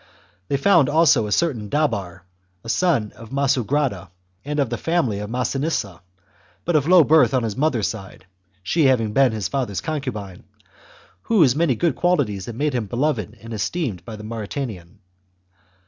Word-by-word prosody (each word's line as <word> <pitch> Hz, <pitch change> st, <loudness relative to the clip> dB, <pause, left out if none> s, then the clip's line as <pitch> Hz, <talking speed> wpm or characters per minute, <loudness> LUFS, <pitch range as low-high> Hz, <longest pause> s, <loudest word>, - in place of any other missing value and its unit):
They 140 Hz, -, 0 dB
found 160 Hz, -1 st, +4 dB
also 150 Hz, -8 st, +4 dB
a -, -, -6 dB
certain 120 Hz, -8 st, 0 dB
Dabar, 100 Hz, -, -1 dB, 0.4 s
a 115 Hz, -, -8 dB
son 130 Hz, -, +1 dB
of 115 Hz, -, -13 dB
Massugrada, 135 Hz, -, 0 dB, 0.3 s
and 150 Hz, +1 st, -3 dB
of 135 Hz, -5 st, 0 dB
the 120 Hz, -, -1 dB
family 160 Hz, -12 st, 0 dB
of 105 Hz, 0 st, -5 dB
Massinissa, 125 Hz, -, -2 dB, 0.6 s
but 175 Hz, -, 0 dB
of 150 Hz, -1 st, +2 dB
low 180 Hz, -1 st, +7 dB
birth 155 Hz, -2 st, +4 dB
on 125 Hz, -, +1 dB
his 110 Hz, -3 st, -3 dB
mother's 135 Hz, -7 st, +1 dB
side 95 Hz, -4 st, -8 dB, 0.4 s
[she 160 Hz, -, +1 dB
having 115 Hz, -5 st, +2 dB
been 135 Hz, -1 st, +4 dB
his 105 Hz, -5 st, -2 dB
father's 120 Hz, -8 st, -2 dB
concubine], 110 Hz, -, -5 dB, 0.8 s
whose 160 Hz, -, +3 dB
many 155 Hz, -5 st, +2 dB
good 160 Hz, +4 st, 0 dB
qualities 130 Hz, -, 0 dB
had 120 Hz, -, -6 dB
made 145 Hz, +3 st, -1 dB
him 120 Hz, -4 st, -2 dB
beloved 120 Hz, -, -2 dB
and 115 Hz, 0 st, -8 dB
esteemed 110 Hz, -, -3 dB
by 115 Hz, -, -8 dB
the 105 Hz, -, -10 dB
Mauritanian. 110 Hz, -4 st, -6 dB
125 Hz, 165 wpm, -22 LUFS, 105-150 Hz, 0.8 s, low